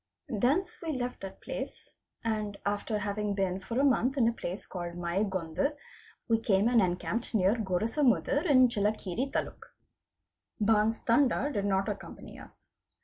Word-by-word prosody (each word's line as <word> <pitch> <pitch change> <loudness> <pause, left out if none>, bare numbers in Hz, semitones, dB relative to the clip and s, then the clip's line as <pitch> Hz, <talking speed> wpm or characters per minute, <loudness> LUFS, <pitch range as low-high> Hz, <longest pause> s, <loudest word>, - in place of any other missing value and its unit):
Thence 275 - +1
we 320 -5 -2
left_ 250 0 -3
that 195 -1 -8
place, - - -7 0.3
and 215 -3 -2
after 205 +2 -1
having 205 0 -2
been 190 -1 0
for 230 +6 -2
a - - +3
month 265 0 +2
in 235 -4 +4
a 235 - +2
place 185 -3 -5
called 175 -2 -6
Mayigond, 180 - -1 0.5
we 225 -1 +3
came 205 -2 +2
and 240 -2 +5
encamped 185 +6 -1
near 195 -1 +4
Gorasamuddar 230 - +1
in 255 -3 +7
Chellakere 215 +2 -1
Taluk. - - -4 0.9
Bhann' 215 +1 +2
Tanda 265 +3 +3
did 200 -3 -1
not 195 -1 +1
accompany - - -7
us. - - -15
215 Hz, 145 wpm, -30 LUFS, 195-245 Hz, 0.9 s, in